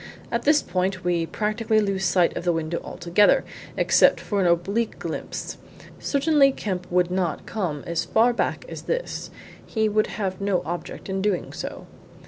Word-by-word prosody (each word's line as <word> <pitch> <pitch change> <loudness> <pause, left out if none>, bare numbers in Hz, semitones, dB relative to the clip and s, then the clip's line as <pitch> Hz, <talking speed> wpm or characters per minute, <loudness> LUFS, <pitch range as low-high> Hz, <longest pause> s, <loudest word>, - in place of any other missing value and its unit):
"At 235 0 -1
this 300 +1 +5
point 185 0 -1
we 170 -2 0
practically 215 +2 0
lose 195 -2 0
sight 175 0 +3
of - - -3
the 175 - +2
window 165 0 -2
altogether, 175 +4 +3 0.3
except - - +5
for 205 -2 -1
an 180 - +3
oblique 195 +7 +1
glimpse. - - -5 0.4
Certainly 280 -1 +3
Kemp 185 -7 -4
would 180 0 +2
not 180 -3 -1
come 170 -10 -3
as 170 -1 -1
far 235 +2 +3
back - - -1
as - - -7
this - - -2 0.3
he 220 -1 0
would 215 0 +2
have 190 -3 -3
no 200 -2 +1
object 175 +1 -5
in 190 0 -2
doing 200 -3 -1
so." - - -6
195 Hz, 165 wpm, -24 LUFS, 175-220 Hz, 0.4 s, this